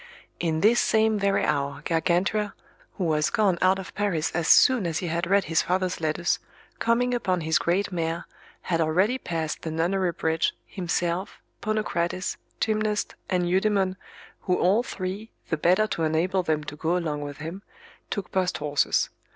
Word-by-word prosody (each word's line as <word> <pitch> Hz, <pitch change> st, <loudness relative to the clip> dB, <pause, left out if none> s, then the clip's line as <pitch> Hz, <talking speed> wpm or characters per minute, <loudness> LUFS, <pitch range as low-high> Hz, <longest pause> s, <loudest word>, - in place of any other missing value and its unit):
In 160 Hz, -2 st, 0 dB
this 230 Hz, +4 st, +5 dB
same 220 Hz, -1 st, +3 dB
very 200 Hz, 0 st, +2 dB
hour 140 Hz, 0 st, -1 dB
Gargantua, 185 Hz, +5 st, +1 dB, 0.4 s
who 190 Hz, -, -1 dB
was 155 Hz, -2 st, +2 dB
gone 195 Hz, -5 st, +2 dB
out 185 Hz, +1 st, +4 dB
of 190 Hz, -1 st, -8 dB
Paris 190 Hz, -7 st, 0 dB
as 165 Hz, -1 st, -1 dB
soon 245 Hz, -8 st, +6 dB
as 160 Hz, -1 st, -1 dB
he 175 Hz, -, -3 dB
had 170 Hz, +1 st, -1 dB
read 200 Hz, 0 st, +4 dB
his 165 Hz, 0 st, +1 dB
father's 185 Hz, -1 st, -1 dB
letters, 160 Hz, +2 st, 0 dB, 0.4 s
coming 245 Hz, +2 st, +2 dB
upon 185 Hz, -7 st, 0 dB
his 160 Hz, 0 st, +2 dB
great 190 Hz, +4 st, 0 dB
mare, 165 Hz, -1 st, -2 dB, 0.4 s
had 165 Hz, -2 st, 0 dB
already 185 Hz, +11 st, +2 dB
passed 160 Hz, -6 st, -3 dB
the 160 Hz, -, -4 dB
Nunnery 175 Hz, +3 st, 0 dB
bridge, 160 Hz, 0 st, 0 dB
himself, 175 Hz, 0 st, -2 dB, 0.2 s
Ponocrates, 185 Hz, -4 st, -1 dB, 0.2 s
Gymnast, 215 Hz, -1 st, 0 dB, 0.2 s
and 180 Hz, -2 st, +1 dB
Eudemon, 190 Hz, 0 st, +2 dB, 0.4 s
who 180 Hz, -, 0 dB
all 195 Hz, +6 st, +3 dB
three, 200 Hz, -1 st, -5 dB, 0.2 s
the 160 Hz, -, 0 dB
better 180 Hz, +7 st, +3 dB
to 190 Hz, -, -3 dB
enable 170 Hz, +4 st, +1 dB
them 155 Hz, -3 st, -1 dB
to 150 Hz, -, -7 dB
go 165 Hz, +4 st, 0 dB
along 155 Hz, -4 st, -2 dB
with 145 Hz, -1 st, -6 dB
him, 165 Hz, +6 st, -6 dB, 0.5 s
took 200 Hz, -3 st, -4 dB
post 185 Hz, -1 st, 0 dB
horses. 145 Hz, -1 st, +1 dB
180 Hz, 165 wpm, -26 LUFS, 160-200 Hz, 0.5 s, soon